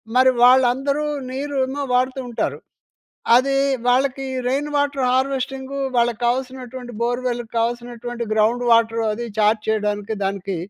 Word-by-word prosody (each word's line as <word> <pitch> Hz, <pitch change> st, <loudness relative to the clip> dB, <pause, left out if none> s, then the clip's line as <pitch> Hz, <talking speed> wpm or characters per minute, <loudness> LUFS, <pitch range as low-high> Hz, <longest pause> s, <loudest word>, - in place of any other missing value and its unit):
మరి 260 Hz, +1 st, +6 dB
వాళ్ళందరూ 260 Hz, +4 st, +4 dB, 0.3 s
నీరు 280 Hz, +2 st, -4 dB
ఏమో 280 Hz, +2 st, -4 dB
వాడుతూ 255 Hz, +1 st, +1 dB
ఉంటారు. 235 Hz, -, -2 dB, 0.8 s
అది 275 Hz, +2 st, +2 dB, 0.3 s
వాళ్ళకి 270 Hz, +2 st, +1 dB, 0.2 s
రెయిన్ 280 Hz, +3 st, -1 dB
వాటర్ 285 Hz, -2 st, 0 dB
హార్వెస్టింగు 270 Hz, +1 st, -2 dB, 0.2 s
వాళ్ళకి 235 Hz, -2 st, +1 dB
కావాల్సినటువంటి 255 Hz, 0 st, -3 dB
బోర్‌వెల్ 245 Hz, 0 st, -1 dB
కావాల్సినటువంటి 240 Hz, +1 st, -3 dB
గ్రౌండ్ 220 Hz, +3 st, +2 dB
వాటర్ 230 Hz, 0 st, +3 dB
అది 235 Hz, +3 st, -4 dB
ఇది 210 Hz, -, -13 dB
చార్జ్ 215 Hz, 0 st, +2 dB
చేయడానికి 210 Hz, 0 st, -1 dB
దానికి 195 Hz, -1 st, -3 dB
245 Hz, 125 wpm, -21 LUFS, 230-265 Hz, 0.8 s, మరి